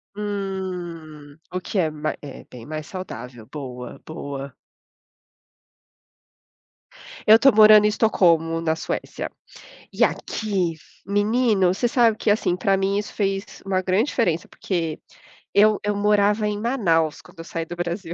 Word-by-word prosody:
Hum, 180 -7 -5
o 185 - -2
que 190 +2 -3
é 165 -3 +2
ma 155 0 -3
é 145 -2 -9
bem 120 -2 -12
mais 155 0 -5
saudável, 125 - -8
boa 125 -4 -7
boa. 140 -4 -6 2.7
Eu 220 +1 +8
tô 275 +3 +6
morando 215 -1 +8
em - - +6
Estocolmo, 170 -7 +2
na 160 -1 0
Suécia. 160 - -4 0.6
E - - -1
aqui 190 -6 -1 0.3
menino, 205 -2 +2
você 240 - 0
sabe 235 -2 +3
que 220 - 0
assim, 205 -4 +1
pra 195 +1 +2
mim 195 +1 0
isso 210 - -5
fez 195 -1 -3
uma 190 -1 0
grande 190 +4 +2
diferença, 175 - 0
porque 165 -5 -3 0.6
eu 210 +1 +5
eu 205 0 0
morava 210 +1 +2
em 205 0 -2
Manaus 175 - +1
quando - - -19
eu - - -6
saí 165 -1 -4
do 175 - -7
Brasil. 175 0 -4
185 Hz, 140 wpm, -23 LUFS, 160-210 Hz, 2.7 s, Eu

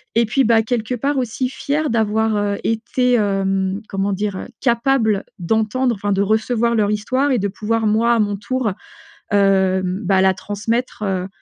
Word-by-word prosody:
Et 230 +1 +4
puis, 265 +5 +2
bah, 225 0 +4
quelque 230 +1 -2
part 275 +4 -1
aussi, 250 +1 -1
fière 295 +3 -2
d'avoir, 220 -1 +1
heu, 205 -1 -1
été, 245 +3 0
hem, 195 -2 0
comment 195 +1 -1
dire, 200 -1 -3
capable 235 -4 +1
d'entendre 220 +6 0
enfin, 205 0 -3
de 195 - +1
recevoir 220 +3 +1
leur 210 -2 +2
histoire 255 +7 0
et 245 - +2
de 200 - 0
pouvoir 220 +3 -1
moi 225 +3 +3
à 235 - +2
mon 205 -1 +1
tour, 250 +2 -2 0.6
heu, 190 -2 +3
bah, 190 +1 +1
la 190 0 +4
transmettre, 215 +5 -3
heu, 190 -2 -1
220 Hz, 170 wpm, -19 LUFS, 200-235 Hz, 0.6 s, Et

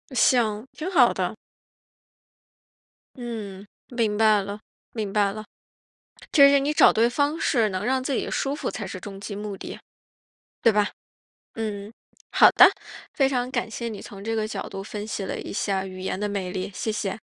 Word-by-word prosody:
行， 225 -2 +2
挺 325 +4 -4
好 255 -9 +5
的。 185 +3 -2 1.8
嗯， 215 -6 -6 0.2
明 225 -4 0
白 215 -2 +5
了， 200 +2 -6 0.3
明 215 -4 -3
白 205 -2 +3
了。 215 +1 -7 0.9
这 280 -1 +8
是 280 0 +5
你 290 +2 0
找 - - +7
对 230 +2 +3
方 290 +5 0
式 225 -5 +2
能 185 +1 -3
让 260 +1 +1
自 270 - -1
己 - - -1
舒 275 +1 -1
服 - - -3
才 205 -4 -5
是 185 - -6
终 195 +1 -9
极 200 0 -6
目 205 -1 -5
的。 - - -8 0.9
对 230 - +5
吧？ 210 0 +2 0.6
嗯， 210 -2 -4 0.4
好 - - +7
的， - - +8 0.5
非 270 -2 +3
常 250 -2 -1
感 240 -3 -2
谢 235 +1 -4
你 215 -3 -7
从 200 0 -10
这 225 0 -1
个 215 -1 -1
角 - - -5
度 195 0 -6
分 210 +1 -6
析 215 - -4
了 - - -4
一 - - -7
下 195 -1 -1
语 185 0 -8
言 185 0 -3
的 210 - -1
魅 195 -3 -3
力， 185 +2 -4
谢 220 - -2
谢。 210 -1 -3
215 Hz, 195 characters per minute, -25 LUFS, 200-240 Hz, 1.8 s, 这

